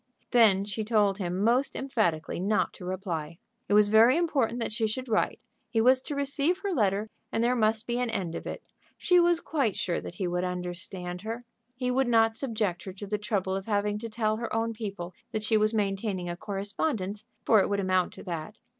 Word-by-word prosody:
Then 210 -5 +5
she 210 +2 -3
told 210 -2 +2
him 185 +1 -1
most 245 +5 +2
emphatically 195 -15 -1
not 205 +4 +1
to 180 - -10
reply. 170 -4 -4 0.3
It 205 - +4
was 210 -1 +6
very 225 +6 +6
important 275 -9 +1
that 230 - -2
she 220 0 +1
should 255 +4 -4
write. 220 -2 +1 0.3
He 225 -1 +1
was 255 +3 +5
to 290 - -5
receive 280 +5 +1
her 400 - -1
letter, 210 - +1 0.2
and 225 - 0
there 245 +1 +3
must 220 -1 +1
be 240 0 -1
an 250 -1 0
end 190 -7 -2
of - - -6
it. - - -6 0.3
She 360 -1 +4
was 345 -1 +4
quite 275 - 0
sure 175 - -1
that - - -8
he 185 0 -2
would 175 +1 -1
understand 180 0 -4
her. 225 +3 -4 0.4
He 250 0 -1
would 265 0 +2
not 225 -1 +4
subject 220 -7 -2
her 190 - -6
to 195 +2 -8
the 210 +1 -2
trouble 195 -3 -1
of 195 +2 -5
having 205 -1 0
to 230 +1 -6
tell 215 -1 0
her 230 0 -4
own 230 0 0
people 200 -5 -6 0.2
that 215 - -2
she 220 +1 +2
was 215 0 +3
maintaining 195 -3 -1
a - - -4
correspondence, 200 - -3 0.2
for 215 -3 +6
it - - 0
would 200 0 0
amount 185 -2 +1
to - - -11
that. 170 +2 -5
215 Hz, 215 wpm, -28 LUFS, 190-235 Hz, 0.4 s, was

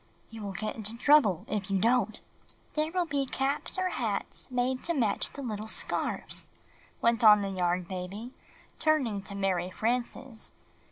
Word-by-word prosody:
"You 225 -1 -8
will 200 -1 -4
get 215 +3 -3
into 220 +1 -7
trouble 245 - +4
if 205 -2 -3
you 195 - +2
don't!" 230 +1 +2 0.5
"There 310 +1 0
will 360 0 +1
be 285 -3 -1
caps 275 +7 -1
or 370 0 +1
hats 225 - -3
made 255 +1 0
to 340 - 0
match 225 -7 +1
the 280 - -7
little 215 -3 -4
scarfs/' - - -1 0.6
went 235 +1 +3
on 210 -2 +8
the 195 - -2
Yarn 180 -1 0
Baby, 190 +7 -6 0.5
turning 265 -10 +2
to 200 +1 -7
Mary 185 -2 0
Frances. 240 +3 -3
225 Hz, 160 wpm, -29 LUFS, 200-265 Hz, 0.6 s, on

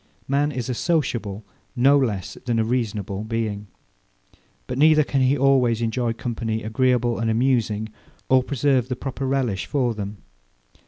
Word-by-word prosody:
Man 145 +2 +1
is 125 -4 -4
a 130 - -1
sociable, 115 - -1 0.3
no 135 +3 +5
less 110 -10 -1
than 120 -2 +1
a 115 - +2
reasonable 110 -4 -2
being: 110 -2 -3 1.0
But 125 +1 -4
neither 155 0 +6
can 140 -1 0
he 130 +2 +3
always 130 -4 +3
enjoy 115 0 -1
company 115 -1 -3
agreeable 120 +1 +1
and 115 0 0
amusing, 110 -3 +1 0.4
or 130 0 +5
preserve 135 -1 +1
the 130 - -1
proper 135 +1 -4
relish 125 -8 -1
for 125 -5 0
them. 105 -1 -6
120 Hz, 150 wpm, -23 LUFS, 110-135 Hz, 1.0 s, neither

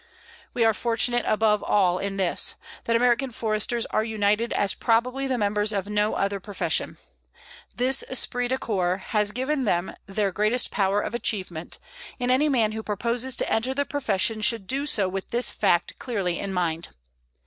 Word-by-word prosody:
We 235 - +3
are 225 - +4
fortunate 240 +2 0
above 215 -1 +2
all 185 -3 +2
in 195 0 -3
this, 185 -3 +2 0.3
that 230 - +1
American 245 +2 +2
Foresters 225 0 0
are 215 - 0
united 220 +1 0
as 200 -2 +1
probably 250 +4 +1
the 260 -1 0
members 210 0 0
of 200 -2 -2
no 210 0 +1
other 200 0 -1
profession. 200 +1 -2 0.8
This 260 +2 +2
esprit 245 -1 0
de 260 +1 0
corps 185 -7 -1
has 210 -2 +2
given 265 +4 -1
them 175 -3 0
their 195 0 0
greatest 215 +6 +1
power 200 0 +1
of - - -4
achievement, 185 -8 -3 0.4
and 250 0 +1
any 290 +4 +3
man 230 -6 +2
who 220 0 -4
proposes 235 +4 -1
to - - -1
enter 255 +4 0
the 285 +1 +1
profession 225 -6 0
should 225 -2 +2
do 275 +6 -1
so 200 -8 +2
with 190 +1 -5
this 240 +1 +1
fact 175 -4 +1
clearly 195 -9 -2
in 200 - -3
mind. 170 -3 -1
215 Hz, 170 wpm, -25 LUFS, 200-245 Hz, 0.8 s, are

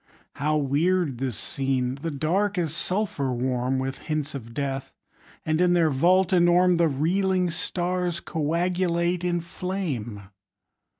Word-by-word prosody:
How 150 +2 +1
weird 150 0 +1
the 135 -1 -1
scene! 130 +2 -1
The 165 - -2
Dark 185 +8 0
is 165 -3 -1
sulphur 180 -8 -1
warm 125 +1 0
With 130 +1 -3
hints 155 -1 -3
of 115 -4 -7
death; 135 +1 -3 0.5
and 155 +2 +1
in 180 -1 +4
their 165 -3 +3
vault 180 +7 +3
enorme 175 0 +4
The 170 -1 +4
reeling 180 +5 +1
stars 180 0 -2
coagulate 170 +2 0
in 175 -1 0
flame. 160 - -4
165 Hz, 130 wpm, -25 LUFS, 135-180 Hz, 0.5 s, in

